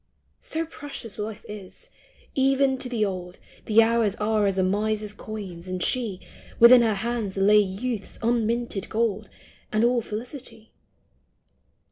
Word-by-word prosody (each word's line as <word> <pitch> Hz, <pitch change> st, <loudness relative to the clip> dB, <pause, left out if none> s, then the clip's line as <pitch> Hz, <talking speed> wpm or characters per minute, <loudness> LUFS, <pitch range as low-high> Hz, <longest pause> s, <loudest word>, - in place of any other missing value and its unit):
So 325 Hz, +1 st, -3 dB
precious 275 Hz, -, -9 dB
life 215 Hz, +1 st, -5 dB
is! 210 Hz, -, -10 dB, 0.4 s
Even 270 Hz, 0 st, +2 dB
to 255 Hz, -, -2 dB
the 225 Hz, -4 st, +1 dB
old. 180 Hz, -2 st, -5 dB, 0.3 s
The 225 Hz, +1 st, +6 dB
hours 225 Hz, -3 st, +2 dB
are 210 Hz, -1 st, +1 dB
as 195 Hz, -1 st, 0 dB
a 190 Hz, -, +3 dB
miser's 210 Hz, +2 st, -1 dB
coins, 195 Hz, -5 st, -8 dB
and 185 Hz, -1 st, -2 dB
she 225 Hz, -7 st, -1 dB, 0.2 s
— -, -, -20 dB
Within 240 Hz, +1 st, +9 dB
her 225 Hz, -3 st, +2 dB
hands 220 Hz, -2 st, -3 dB
lay 205 Hz, +2 st, +6 dB
youth's 205 Hz, +3 st, -3 dB
unlimited 235 Hz, -3 st, 0 dB
gold 215 Hz, -2 st, -1 dB, 0.4 s
And 215 Hz, +1 st, +2 dB
all 240 Hz, 0 st, +3 dB
felicity. 230 Hz, +1 st, -8 dB
220 Hz, 140 wpm, -25 LUFS, 200-240 Hz, 0.4 s, Within